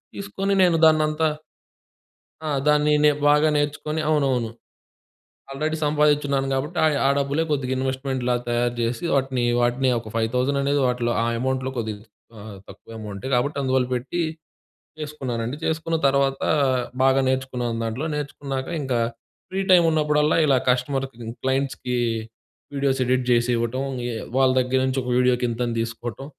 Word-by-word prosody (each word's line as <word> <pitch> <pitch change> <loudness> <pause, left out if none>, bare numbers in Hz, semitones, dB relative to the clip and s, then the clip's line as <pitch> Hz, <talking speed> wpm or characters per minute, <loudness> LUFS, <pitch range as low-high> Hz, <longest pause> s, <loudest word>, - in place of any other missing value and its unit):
తీసుకొని 200 0 -2
నేను 175 -2 +4
దాన్నంతా 155 0 +3 1.2
ఆ! - - -1 0.2
దాన్ని 150 0 +4
నే - - +7 0.2
బాగా 150 +1 +4
నేర్చుకుని 150 +1 -1
అవునవును. 135 -6 +1 1.0
ఆల్రెడీ 155 +3 -2
సంపాదిచిన్నాను. 145 -2 +2
కాబట్టి 150 +6 -3 0.3
ఆ - - +4
డబ్బులే 140 +3 0
కొద్దిగా 130 -3 -1
ఇన్వెస్ట్మెంట్‌లాగా 130 -2 -1
తయారు 120 0 0
చేసి 115 +5 -2
వాటిని, 130 -2 0 0.2
వాటిని 120 +2 +2
ఒక 110 -1 -10
5000 125 +5 0
అనేది 140 +1 +1
వాటిలో 120 -1 0
ఆ - - 0
అమౌంట్‌లో 130 +1 -1
కొద్దిగా 110 -3 -4 0.4
ఆహ్, 105 -1 -9
తక్కువ - - -14
అమౌంట్. 105 -1 -7
కాబట్టి 140 +4 0
అందువల్ల 130 -1 +1
పెట్టి 135 +8 -3 0.8
చేసుకున్నానండి. 130 -4 -4
చేసుకున్న 160 +1 -1
తర్వాత, 135 0 +1 0.6
బాగా 135 0 +4
నేర్చుకున్నాను 125 -3 -1
దాంట్లో, 115 +7 -3
నేర్చుకున్నాక 140 -2 -4
ఇంకా 130 -3 -1 0.5
ఫ్రీ 190 - -1
టైమ్ 175 -2 +7
ఉన్నప్పుడల్లా 150 0 +2
ఇలా 135 -3 +4
కస్టమర్‌కి, 135 0 -1 0.3
క్లయింట్స్‌కి 130 -2 -1 0.8
వీడియోస్ 135 -1 0
ఎడిట్ 130 0 +1
చేసి 120 +1 +3
ఇవ్వటం, 120 +3 -2 0.3
ఏ - - -4 0.2
వాళ్ళ 130 -1 +4
దగ్గర 130 +1 0
నుంచి 130 0 -1
ఒక 125 - -3
వీడియోకి 125 -1 +2
ఇంతని 120 0 -2
తీసుకోవటం. 115 +3 -6
130 Hz, 135 wpm, -23 LUFS, 125-150 Hz, 1.2 s, నే